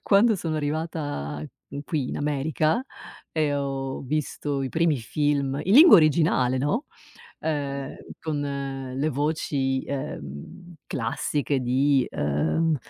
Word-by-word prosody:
quando 210 +2 +4
sono 160 -3 -2
arrivata 145 - -3 0.3
qui 145 -2 -3
in - - -4
America 155 - 0 0.5
e 155 -3 +1
ho 135 -1 -3
visto 145 0 -2
i 130 - -2
primi 160 +1 +2
film 140 +2 0
in 195 +5 +3
lingua 315 - +10
originale, 155 -5 +3
no, 145 - 0 0.6
ehm, 140 -3 -3 0.2
con 155 -2 -2 0.6
le 145 +3 +1
voci, 140 -2 0
ehm, 135 - -7
classiche 130 +3 -1
di, 130 +2 +2
uhm, 80 - +1
145 Hz, 110 wpm, -25 LUFS, 135-155 Hz, 0.6 s, lingua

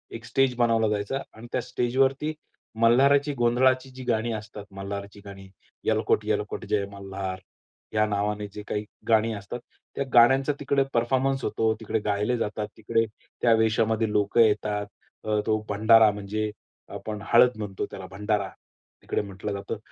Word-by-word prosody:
एक 115 0 -8
स्टेज 125 +1 +2
बनवला 115 -2 +3
जायचा 105 +5 -1 0.2
आणि 115 +2 -11
त्या 125 - 0
स्टेजवरती 130 +4 0 0.5
मल्हाराची 140 +5 +4
गोंधळाची 130 +1 +2
जी 130 0 -10
गाणी 115 -1 0
असतात, 105 -1 -7
मल्हाराची 100 +1 -6
गाणी, 95 -1 -10 0.4
"येळकोट-येळकोट 105 +2 0
जय 105 -2 +1
मल्हार" 95 -1 -5 0.5
या 110 0 +3
नावाने 105 0 -1
जे 105 - -7
काही 105 - -2 0.3
गाणी 110 0 +3
असतात. 100 +3 -6 0.4
त्या 140 - 0
गाण्यांचा 135 +4 +5
तिकडे 140 -1 +2
परफॉर्मन्स 130 +3 +1
होतो, 110 +1 +1
तिकडे 110 0 -1
गायले 105 +4 0
जातात. 105 -1 -2
तिकडे 115 +1 +1 0.4
त्या 115 - +5
वेशामध्ये 110 0 +2
लोकं 105 +3 +3
येतात. 105 -1 +2 0.4
अ, 105 -1 0
तो 110 -1 +2
भंडारा 110 +1 +6
म्हणजे 105 +1 -3 0.5
आपण 105 -1 -6
हळद 120 0 +6
म्हणतो, 100 -3 -3
त्याला 95 -1 -8
भंडारा 105 0 -1 0.5
तिकडे - - -1
म्हटलं 100 0 -6
जातं. 100 +2 -4
110 Hz, 145 wpm, -26 LUFS, 105-120 Hz, 0.5 s, भंडारा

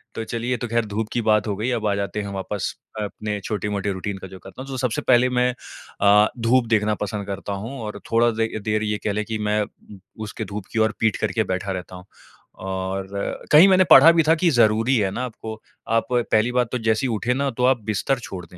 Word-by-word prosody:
तो 115 - -3
चलिए, 115 +2 -4
ये 125 - +1
तो 120 - -4
ख़ैर 115 0 0
धूप 105 +1 -3
की 120 - 0
बात 105 -1 +3
हो 100 - -1
गई 110 +5 -1
अब 110 -3 -1
आ 100 - +2
जाते 100 +1 -3
हैं 100 - -6
वापस 95 0 -3 0.3
अपने 105 0 -4
छोटे-मोटे 105 -1 -2
रूटीन 95 +1 -4
का 95 - -8
जो 95 0 -12
करता 130 - -11
हूँ। 135 - -12
तो 130 - -4
सबसे 125 -3 -1
पहले 125 0 +5
मैं 125 0 +2 0.5
अ, 105 +1 +6
धूप 120 +2 +3
देखना 105 0 +2
पसंद 105 -1 -5
करता 100 0 -4
हूँ 135 +2 -7
और 105 -1 -6
थोड़ा 120 +1 +4
दे 115 0 0 0.2
देर 110 0 0
ये 105 0 -1
कह 105 - +1
लें 105 +1 -1
कि 110 0 -3
मैं 105 0 +2
उम, 100 -1 -14 0.2
उसके 105 - -5
धूप 100 -2 -5
की 110 - 0
ओर 110 0 +2
पीठ 110 -3 +1
करके - - 0
बैठा 95 +1 -3
रहता 90 -1 -6
हूँ। 90 0 -11 0.6
और 95 0 -3 0.4
कहीं 160 +6 +9
मैंने 185 -1 +5
पढ़ा 150 +5 +10
भी 165 -1 +3
था 160 - +6
कि 175 - +4
ज़रूरी 115 +3 +3
है 100 -3 +1
ना, 125 - -3
आपको 110 -2 -8 0.3
आप 115 0 +2
पहली 120 -1 +2
बात 125 -2 +1
तो 125 - -1
जैसे 110 +3 +1
ही 120 - -1
उठे 120 +4 0
ना, 140 +1 0
तो 125 +2 0
आप 130 -2 +3
बिस्तर 115 +5 0
छोड़ 95 -6 -8
दें। 90 - -16
110 Hz, 240 wpm, -22 LUFS, 100-120 Hz, 0.6 s, पढ़ा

